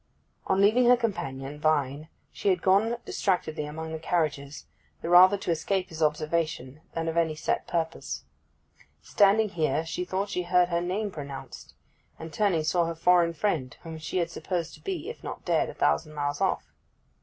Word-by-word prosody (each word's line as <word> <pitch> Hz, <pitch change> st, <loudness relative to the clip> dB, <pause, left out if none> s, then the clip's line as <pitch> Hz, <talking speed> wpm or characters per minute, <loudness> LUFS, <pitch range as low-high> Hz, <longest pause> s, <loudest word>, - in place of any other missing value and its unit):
On 190 Hz, -, +2 dB
leaving 215 Hz, +5 st, +5 dB
her 250 Hz, 0 st, +7 dB
companion 150 Hz, -, -4 dB
Vine 150 Hz, -1 st, 0 dB, 0.2 s
she -, -, -1 dB
had 180 Hz, -2 st, +1 dB
gone 210 Hz, +5 st, +3 dB
distractedly 160 Hz, -5 st, -1 dB
among 160 Hz, +2 st, -6 dB
the 160 Hz, -, -4 dB
carriages, 150 Hz, -4 st, -2 dB, 0.4 s
the 165 Hz, -, -3 dB
rather 185 Hz, +3 st, +8 dB
to 195 Hz, -, -2 dB
escape 185 Hz, +3 st, -1 dB
his 160 Hz, 0 st, -8 dB
observation 155 Hz, -2 st, -1 dB
than 165 Hz, 0 st, -2 dB
of 165 Hz, +1 st, -2 dB
any 165 Hz, -2 st, +2 dB
set -, -, -2 dB
purpose. 165 Hz, -1 st, -3 dB, 0.8 s
Standing 210 Hz, +1 st, +4 dB
here 160 Hz, -3 st, 0 dB
she 170 Hz, +2 st, -3 dB
thought 190 Hz, +3 st, -2 dB
she 180 Hz, -, -1 dB
heard 180 Hz, 0 st, +3 dB
her 170 Hz, -1 st, 0 dB
name 200 Hz, +4 st, -2 dB
pronounced, 140 Hz, -4 st, -9 dB, 0.4 s
and 160 Hz, 0 st, -9 dB
turning, 195 Hz, -7 st, +1 dB
saw 170 Hz, +2 st, +2 dB
her 165 Hz, 0 st, -3 dB
foreign 170 Hz, 0 st, +3 dB
friend, 150 Hz, -, -1 dB
whom 160 Hz, -1 st, -7 dB
she 155 Hz, +4 st, -4 dB
had 170 Hz, -2 st, 0 dB
supposed 170 Hz, -1 st, -3 dB
to -, -, -14 dB
be, 370 Hz, -3 st, -4 dB
if 460 Hz, -, -8 dB
not -, -, -7 dB
dead, -, -, +1 dB
a -, -, -9 dB
thousand 155 Hz, -1 st, +1 dB
miles 145 Hz, -1 st, -2 dB
off. -, -, -1 dB
170 Hz, 180 wpm, -27 LUFS, 155-190 Hz, 0.8 s, rather